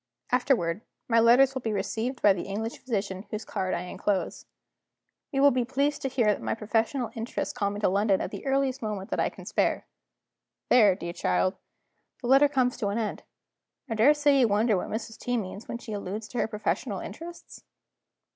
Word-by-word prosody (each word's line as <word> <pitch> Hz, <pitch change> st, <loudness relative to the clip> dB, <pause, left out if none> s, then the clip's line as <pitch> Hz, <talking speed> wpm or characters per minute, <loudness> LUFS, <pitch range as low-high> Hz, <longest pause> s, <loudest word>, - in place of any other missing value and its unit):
Afterward, 230 Hz, -8 st, +1 dB, 0.3 s
my 230 Hz, -1 st, +4 dB
letters 250 Hz, +4 st, +6 dB
will 260 Hz, -, -4 dB
be 225 Hz, -, -2 dB
received 220 Hz, +6 st, -3 dB
by 205 Hz, -, +7 dB
the 190 Hz, -, -5 dB
English 220 Hz, +4 st, -4 dB
physician 200 Hz, -5 st, -3 dB
whose 215 Hz, +1 st, -5 dB
card 190 Hz, -3 st, -2 dB
I -, -, -3 dB
inclose. 190 Hz, +2 st, -2 dB, 0.8 s
You 275 Hz, -2 st, +1 dB
will 285 Hz, -, +7 dB
be 250 Hz, 0 st, +1 dB
pleased 280 Hz, +4 st, 0 dB
to -, -, -1 dB
hear 250 Hz, -3 st, +1 dB
that 210 Hz, -1 st, +2 dB
my -, -, -1 dB
professional 225 Hz, +3 st, -1 dB
interests 230 Hz, +1 st, -3 dB
call 205 Hz, -5 st, 0 dB
me 205 Hz, +1 st, -5 dB
to -, -, +3 dB
London 195 Hz, +1 st, +2 dB
at -, -, -4 dB
the -, -, -7 dB
earliest 270 Hz, -1 st, +1 dB
moment 210 Hz, -3 st, -4 dB
that -, -, -1 dB
I -, -, +2 dB
can -, -, -13 dB
spare.' -, -, 0 dB, 0.8 s
There, 210 Hz, -6 st, +6 dB
dear 170 Hz, -2 st, -6 dB
child, 185 Hz, +2 st, +1 dB, 0.6 s
the -, -, -8 dB
letter 275 Hz, +2 st, +7 dB
comes 260 Hz, -3 st, +1 dB
to 205 Hz, -, -1 dB
an 200 Hz, +2 st, -1 dB
end. 220 Hz, -2 st, -2 dB, 0.7 s
I 230 Hz, -, -3 dB
daresay 285 Hz, +5 st, +4 dB
you 245 Hz, -, +5 dB
wonder 215 Hz, +1 st, +2 dB
what 180 Hz, -, -3 dB
Mrs. 220 Hz, 0 st, -5 dB
T. 245 Hz, 0 st, -1 dB
means, 205 Hz, 0 st, -6 dB
when -, -, -4 dB
she 225 Hz, -2 st, -8 dB
alludes 205 Hz, +2 st, -5 dB
to 245 Hz, -, -4 dB
her -, -, +1 dB
professional 210 Hz, -1 st, -2 dB
interests?" 335 Hz, +11 st, -9 dB
225 Hz, 195 wpm, -27 LUFS, 205-255 Hz, 0.8 s, by